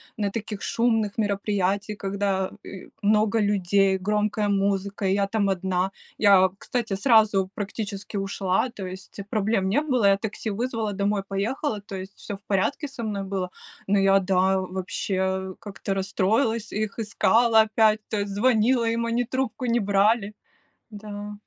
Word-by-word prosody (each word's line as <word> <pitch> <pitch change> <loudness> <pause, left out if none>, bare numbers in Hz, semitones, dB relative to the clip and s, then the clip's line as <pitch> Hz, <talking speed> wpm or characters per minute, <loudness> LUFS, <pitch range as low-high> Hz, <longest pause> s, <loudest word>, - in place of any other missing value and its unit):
на 205 -2 -1
таких 210 -1 -5
шумных 225 -3 0
мероприятиях, 200 -1 -1
когда, 195 -1 -1
э, 190 - -10
много 215 +1 +3
людей, 195 -1 +2
громкая 210 +2 0
музыка, 200 0 0
и 190 - +2
я 200 0 +1
там 200 -1 0
одна. 190 0 0 0.3
Я, 195 -3 +6
кстати, 230 -3 -3
сразу 205 -3 +4
практически 205 0 -5
ушла, 195 +3 0
то 195 -5 -7
есть 190 +2 -9
проблем 210 -2 +1
не 235 +10 +2
было, 255 -8 +1
я 195 0 +5
такси 220 +1 -4
вызвала, 225 -1 -2
домой 200 0 0
поехала, 210 +3 -2
то 200 -1 -8
есть 190 +1 -7
всё 205 - -7
в - - -27
порядке 210 - 0
со 265 -3 -7
мной 205 -3 -3
было. 190 -2 -3 0.4
Но 200 0 +3
я, 195 0 +5
да, 190 0 +2
вообще 190 +1 -2
как-то 200 -2 -5
расстроилась, 210 +4 0
их 215 +1 -3
искала 225 +1 +4
опять, 220 0 +3
то 215 - -2
есть 200 0 -3
звонила 235 +2 +3
им, 230 0 0
они 235 +1 0
трубку 260 0 -2
не 235 0 +2
брали. 205 +1 +2 0.6
Да. 210 -1 -7
205 Hz, 155 wpm, -25 LUFS, 195-220 Hz, 0.6 s, Я